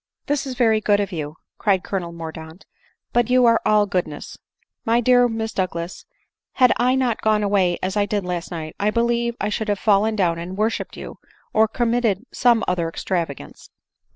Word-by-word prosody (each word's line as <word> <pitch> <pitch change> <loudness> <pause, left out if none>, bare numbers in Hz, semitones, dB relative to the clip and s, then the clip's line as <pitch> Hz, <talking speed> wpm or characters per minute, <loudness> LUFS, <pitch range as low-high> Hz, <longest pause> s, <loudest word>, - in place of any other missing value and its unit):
" - - -62
This 285 -1 -1
is 260 - -5
very 225 -3 +3
good 205 -1 +3
of 205 0 -2
you," 155 -3 -5 0.2
cried 195 -3 +2
Colonel 180 -4 -3
Mordaunt; 160 +1 -9 0.2
" - - -46
but 240 0 +2
you 250 0 +4
are 230 -1 +4
all 210 -1 +4
goodness! 175 -6 -4 0.3
— - - -42
My 230 +1 +2
dear 245 +1 +4
Miss 225 -1 -3
Douglas, 175 -2 -3 0.5
had 250 -2 +4
I 250 +1 +2
not 255 -4 0
gone 215 -1 +2
away 195 -4 +2
as 185 +2 -2
I 205 -1 +1
did 205 -2 -2
last 175 -1 -4
night, 160 -3 -6
I 205 - +2
believe 235 +1 0
I 205 - -1
should 220 +1 -2
have 205 -1 0
fallen 215 +2 +2
down 170 -5 +1
and 180 +3 -6
worshipped 220 +2 -2
you, - - -9 0.3
or 220 0 +4
committed 235 -2 0
some 240 -2 +3
other 170 -2 0
extravagance." 165 -5 -4
210 Hz, 195 wpm, -22 LUFS, 180-235 Hz, 0.5 s, you